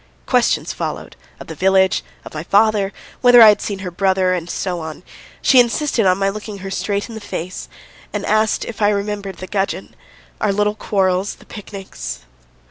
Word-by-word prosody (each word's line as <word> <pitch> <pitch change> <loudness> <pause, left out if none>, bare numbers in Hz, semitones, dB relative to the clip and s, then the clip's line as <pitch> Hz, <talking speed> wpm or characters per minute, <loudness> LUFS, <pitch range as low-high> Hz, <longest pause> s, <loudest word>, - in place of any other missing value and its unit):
Questions - - +1
followed, - - -5 0.2
of - - -9
the 160 - -7
village, 190 +2 +3 0.2
of - - -10
my 155 - -4
father, 205 +2 +2 0.3
whether 245 -1 +7
I 225 -2 +11
had 210 - +3
seen 200 - -3
her 180 - -4
brother, 190 0 +2
and 175 -1 -3
so 180 -1 -2
on. 160 +1 -7 0.4
She 260 - +6
insisted 240 -2 +2
on 185 0 +4
my 195 0 +1
looking 210 +1 -5
her 195 - -5
straight 200 +2 -2
in 235 - -10
the 220 - -7
face, 185 -3 -6 0.4
and - - -3
asked 215 0 +1
if 230 - -8
I 205 - +5
remembered 200 -2 -3
the 185 - -7
gudgeon, 195 0 -3 0.4
our 210 - +1
little 210 +1 +1
quarrels, 195 -2 0
the - - -19
picnics. 190 - -8
195 Hz, 185 wpm, -19 LUFS, 185-210 Hz, 0.4 s, I